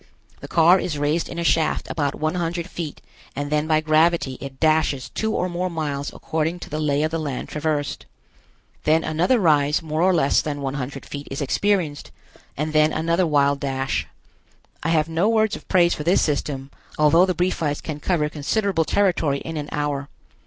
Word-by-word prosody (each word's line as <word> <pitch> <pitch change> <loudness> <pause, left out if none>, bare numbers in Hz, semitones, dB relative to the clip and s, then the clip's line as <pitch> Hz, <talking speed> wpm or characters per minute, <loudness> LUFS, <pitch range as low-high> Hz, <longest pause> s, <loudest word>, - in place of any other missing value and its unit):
The - - -9
car 170 +3 +5
is 160 -5 -3
raised 150 +3 0
in 170 - -7
a 170 - -1
shaft 165 -1 +1
about 145 -3 -1
one 155 0 -1
hundred 170 0 -2
feet 165 -5 -6 0.3
and 145 +1 -4
then 150 +1 +1
by 155 -1 +3
gravity 155 -3 +2
it 135 -1 -8
dashes 155 -4 +1
two 220 0 -2
or 180 - 0
more 180 +1 -2
miles 150 -4 -3
according 160 +2 -2
to - - -9
the 155 - -2
lay 145 -1 +1
of 155 - 0
the 165 - -1
land 145 -5 -4
traversed. 150 -2 -2 0.8
Then 160 +2 +3
another 175 +10 +2
rise 150 -3 +3
more 155 0 -2
or 185 +2 +4
less 155 -6 +3
than 145 -2 -4
one 135 -1 -3
hundred 140 -1 -5
feet 145 0 -7
is 135 - -5
experienced, 155 0 0 0.5
and 155 +2 -2
then 155 0 +4
another 165 +3 +1
wild 140 -2 +2
dash. 135 -1 -2 0.7
I 165 - -1
have 155 -2 +2
no 165 +6 +1
words 220 -1 +2
of - - -12
praise 175 -2 +4
for 150 - -5
this 175 +5 +3
system, 140 -2 -2 0.3
although 165 +4 +5
the 185 - 0
Briefites 165 -5 -1
can 150 -2 -5
cover 155 -1 0
considerable 165 +4 0
territory 170 -8 +1
in 165 - -6
an 150 -1 -4
hour. 145 -1 -2
155 Hz, 190 wpm, -22 LUFS, 145-170 Hz, 0.8 s, car